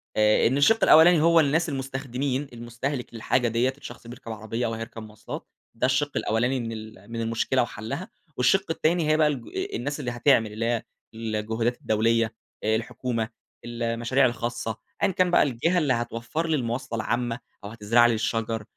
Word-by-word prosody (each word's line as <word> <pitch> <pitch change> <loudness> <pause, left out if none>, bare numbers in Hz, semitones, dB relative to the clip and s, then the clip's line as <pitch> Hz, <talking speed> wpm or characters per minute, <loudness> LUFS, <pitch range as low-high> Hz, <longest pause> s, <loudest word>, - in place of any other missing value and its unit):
آآ 105 +1 +4
إن 130 - +1
الشِق 225 +11 +4
الأولاني 160 +1 +7
هو 165 +1 +5
الناس 160 +3 +2
المستخدمين 135 0 -3
المستهلك 120 +3 -5
للحاجة 120 +2 +1
ديّة، 120 +4 +1
الشخص 120 -4 -11
بيركب 120 -1 -9
عربية 110 +2 -3
أو 115 - -2
هيركب 115 0 -7
مواصلات، 110 -1 -9 0.3
ده 115 - 0
الشِق 130 +3 +1
الأولاني 120 +5 +1
من 115 -1 -4
ال 110 +1 -10
من 115 - -3
المشكلة 115 +3 +1
وحلَّها. 120 - -5 0.3
والشِق 190 +11 +3
التاني 160 0 +1
هي 155 - +4
بقى 155 - +4
الج 135 -6 -3 0.3
الناس 145 +5 -3
اللي 125 - -3
هتعمل، 120 -3 +3
اللي 110 +2 -2
هي 115 -1 0 0.3
الجهودات 110 +2 -2
الدولية، 115 +1 +1 0.3
الحكومة، 115 +1 -1 0.4
المشاريع 120 +2 +1
الخاصة، 120 -2 -2 0.3
أيًّا 200 - +4
كان 180 0 +2
بقى - - +5
الجهة 145 +7 0
اللي 145 -6 +2
هتوفر 120 +7 -3
لي 160 - +2
المواصلة 120 -2 -3
العامة، 120 +1 -1 0.2
أو 100 - -6
هتزرع 115 +2 +3
لي 120 - +4
الشجر 110 0 -1
120 Hz, 165 wpm, -25 LUFS, 115-135 Hz, 0.4 s, الأولاني